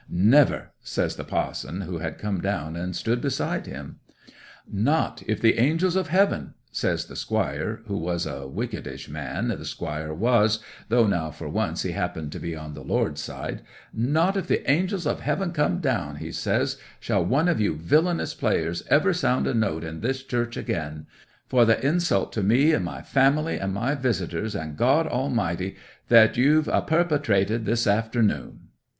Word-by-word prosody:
'"Never!" 115 +11 +4
says - - -2
the - - -6
pa'son, 90 +6 -3
who 90 -2 -5
had 80 -1 -4
come 100 -4 -2
down 85 -5 -2
and 90 +1 -4
stood 115 +7 0
beside 140 -3 -1
him. - - -8 0.7
'"Not 130 +11 0
if 110 - 0
the 115 0 +4
Angels 165 +8 +2
of 190 -1 +1
Heaven," 195 +5 +1 0.2
says - - -1
the - - -12
squire 80 +11 -2
(he 100 - -4
was 85 -1 -1
a 70 -1 -5
wickedish 70 - -5
man, - - -3
the - - -3
squire 75 +1 -4
was, 110 +4 +3 0.3
though 115 0 +4
now 85 -6 0
for - - -8
once - - -1
he - - -2
happened 75 -2 -3
to - - -6
be 85 -1 -4
on 75 -1 -8
the - - -9
Lord's - - 0
side)—"not 155 - -2
if 195 - -2
the - - 0
Angels 180 +5 +1
of 145 - 0
Heaven 175 +5 -1
come 165 +2 +1
down," 125 - -1
he - - -6
says, - - 0 0.2
"shall 95 - 0
one 135 - +2
of 170 -10 +2
you 100 -7 +1
villanous 155 - +1
players 85 +1 0
ever 180 +6 +4
sound 130 -7 +1
a - - 0
note 100 -9 0
in 80 0 -6
this 130 +2 -1
church 120 -2 -2
again; 75 -2 -4 0.4
for 125 -2 +4
the 115 -1 +4
insult 155 - +1
to 110 - -1
me, 125 +11 +4
and 95 - +1
my 85 - -5
family, 140 +4 +2
and 95 0 -2
my 115 +9 0
visitors, 110 - -2
and 80 -5 -5
God 140 +7 +4
Almighty, 115 - -1 0.3
that 115 -2 +6
you've 150 +5 +4
a - - +2
perpetrated 135 - +1
this 115 +2 +1
afternoon!" 110 - 0
115 Hz, 175 wpm, -25 LUFS, 85-145 Hz, 0.7 s, that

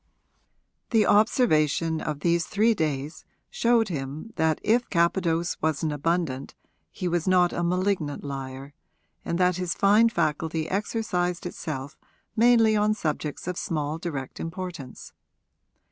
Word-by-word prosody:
The 220 -3 +3
observation 165 - +3
of 150 -1 -4
these 170 0 +1
three 220 +3 +3
days 150 -4 -3 0.3
showed 230 -2 +2
him 150 +7 -5
that 160 -1 +1
if 240 +2 +2
Capadose 170 -1 +1
was 155 -1 0
an 155 - 0
abundant 150 -2 -2 0.3
he 185 - -4
was 175 -1 -1
not 180 -1 +4
a - - -2
malignant 180 -4 -1
liar 135 0 -6 0.5
and 170 - -2
that 180 -1 +2
his 180 -2 -2
fine 210 +3 +5
faculty 160 -3 -1
exercised 180 -3 -1
itself 145 -5 -6 0.4
mainly 225 -1 +5
on 210 0 +2
subjects 155 -4 -3
of 180 -1 -2
small 155 -4 -2
direct 145 -7 -5
importance. 165 -6 -7
170 Hz, 130 wpm, -26 LUFS, 150-200 Hz, 0.5 s, fine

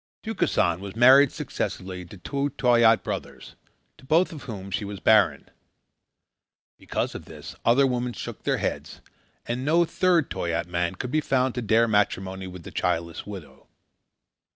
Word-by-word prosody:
Tukesan 180 - 0
was 100 +1 -8
married 130 +4 +7
successively 90 -1 -5
to 95 +4 -12
two 140 - -2
Toyaat 120 -2 +4
brothers, - - -6 0.4
to - - -18
both 165 +6 +2
of 150 - -10
whom 100 -5 -7
she 100 - -2
was 100 -1 -6
barren. 100 -11 +3 1.3
Because - - -3
of - - -8
this, - - -10
other 130 +4 +4
women 125 -1 -1
shook - - -7
their - - 0
heads, - - -4 0.4
and 120 +2 -3
no 165 +4 +3
third 175 -2 +1
Toyaat 85 -1 -2
man 90 +1 -2
could 125 +6 -5
be 155 - +2
found 130 -3 +1
to 125 - -3
dare 115 +1 +3
matrimony 95 -3 0
with 90 -2 -10
the - - -9
childless 85 +2 -2
widow. 95 -7 -10
110 Hz, 155 wpm, -25 LUFS, 95-130 Hz, 1.3 s, married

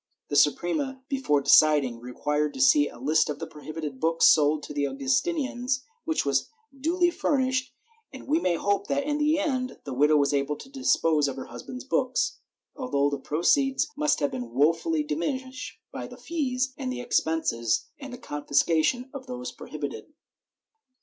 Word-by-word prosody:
The 145 - -2
Suprema, 260 - +1
before 260 - +1
deciding, 140 -4 +5
required 145 +4 -2
to - - -7
see 145 +3 +5
a - - -13
list 155 +5 +2
of 145 - -3
the 165 - -5
prohibited 150 -2 -7
books 165 +2 +2
sold 150 0 +5
to - - -7
the 145 -1 0
Augustinians, 255 - -1 0.2
which 320 - 0
was 140 -1 +1 0.3
duly 345 +5 +1
furnished, 260 -5 0 0.4
and 265 - -11
we 305 +4 +2
may 180 - +1
hope 200 +3 0
that, 280 0 0
in 295 +1 -1
the 300 +1 +3
end, 260 -5 -1
the 140 - -6
widow 150 +4 +4
was 140 0 +2
able 140 +1 0
to 265 - -12
dispose 165 - +2
of 135 - -3
her 135 - -6
husband's 255 0 -8
books, 260 -1 0 0.4
although 145 - 0
the 140 - -2
proceeds 265 - +1
must 300 - +1
have 145 - +1
been 120 -2 -5
wofully 155 +4 +2
diminished 260 - -4
by - - -6
the - - -12
fees 270 -5 -2
and 260 -2 -3
expenses 160 - 0
and 275 -2 -8
the 245 - -7
confiscation 160 - +1
of 270 -2 -8
those 250 0 -5
prohibited. - - -7
165 Hz, 165 wpm, -26 LUFS, -, 0.4 s, deciding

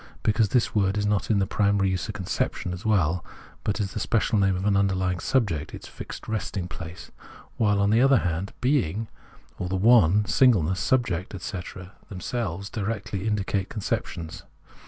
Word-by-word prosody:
because 110 -1 +2
this 125 -3 +1
word 100 -1 +2
is 105 - 0
not 105 -1 0
in 105 -3 +3
its 95 - +1
primary 100 -2 +2
use 90 -4 -2
a - - 0
conception 90 - -2
as 90 - -7
well, 90 -6 +2 0.4
but 105 - 0
the 105 0 -3
special 110 0 +1
name 95 -1 +3
of 90 +2 -3
an 105 -1 +3
underlying 95 -2 +1
subject, 90 - 0
its - - -10
fixed - - -9
resting 105 -4 -3
place; 85 -1 -9 0.5
while, 105 -2 +2
on 100 +1 +3
the 115 +2 +4
other 135 0 +6
hand, 90 0 -2
being 115 - +1 0.5
or 90 - -3
the 95 - -1
one, 105 -1 +5
singleness, 95 - +3
sub 125 +3 +2
ject, 90 +2 -4
etc., 90 -1 -7 0.2
themselves 100 -1 -3
directly 105 -1 -3
indicate 100 -2 -1
conceptions. 90 -7 -4
100 Hz, 170 wpm, -26 LUFS, 90-110 Hz, 0.5 s, other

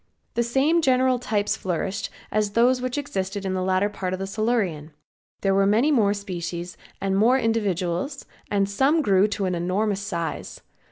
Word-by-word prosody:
The 235 - +1
same 275 +8 +2
general 255 -2 +3
types 210 -4 0
flourished 195 +3 -3 0.2
as 210 -1 0
those 250 +3 +3
which 255 +2 -2
existed 200 -8 -3
in 190 - -1
the 185 - -1
latter 185 +2 +2
part 190 -3 -4
of 185 - -3
the 195 - -2
Silurian. 195 -8 -1 0.5
There 195 -1 +2
were 195 0 +3
more 220 -1 +3
species 175 -3 -5 0.2
and 195 0 0
more 230 +6 +4
individuals 210 - -1 0.2
and 200 -1 +1
some 270 +11 +2
grew 195 -3 +4
to 205 -1 -2
an 185 - 0
enormous 190 +4 0
size. 170 -5 -4
200 Hz, 165 wpm, -24 LUFS, 190-235 Hz, 0.5 s, more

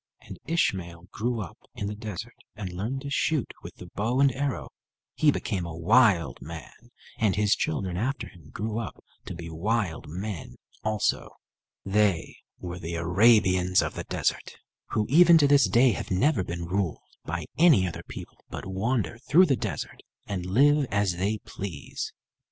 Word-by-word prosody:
And - - -11
Ishmael 90 - -1
grew 115 +1 -2
up 95 - -8 0.2
in 100 - -4
the 105 - -3
desert 105 -4 -6 0.2
and 95 -4 -6
learned 115 +9 -3
to 140 0 -6
shoot 150 -1 0
with - - -10
the - - -11
bow 115 +5 0
and 140 -1 +5
arrow. 140 +1 -3 0.4
He 155 - +3
became 100 -9 -1
a 85 -1 -6
wild 90 - +3
man, 80 -1 -8 0.5
and 105 -4 +2
his 105 0 +3
children 90 +3 -2
after 130 +8 -2
him 85 -7 -16
grew 110 +5 -3
up 115 - -7 0.2
to - - -6
be 85 0 -7
wild 90 +2 -2
men 90 - -6 0.3
also. 110 -1 0 0.6
They 100 -4 +1 0.2
were 90 0 -6
the 85 0 -5
Arabians 95 +1 +4
of - - -3
the - - -6
desert, - - -2 0.3
who 105 - 0
even 170 +4 +7
to 145 -3 +5
this 140 -7 +5
day 120 +6 +5
have - - -4
never 100 +3 +2
been 85 -1 -5
ruled 90 -1 -2 0.2
by 85 -1 -4
any 155 - +6
other 85 - -6
people, - - -9
but - - -6
wander 100 +1 -1
through 175 +6 +7
the 140 -6 +2
desert, - - -5 0.2
and 90 -3 -4
live 140 +7 +4
as 100 -3 +1
they 100 +4 0
please. 90 -8 -6
100 Hz, 170 wpm, -27 LUFS, 90-120 Hz, 0.6 s, even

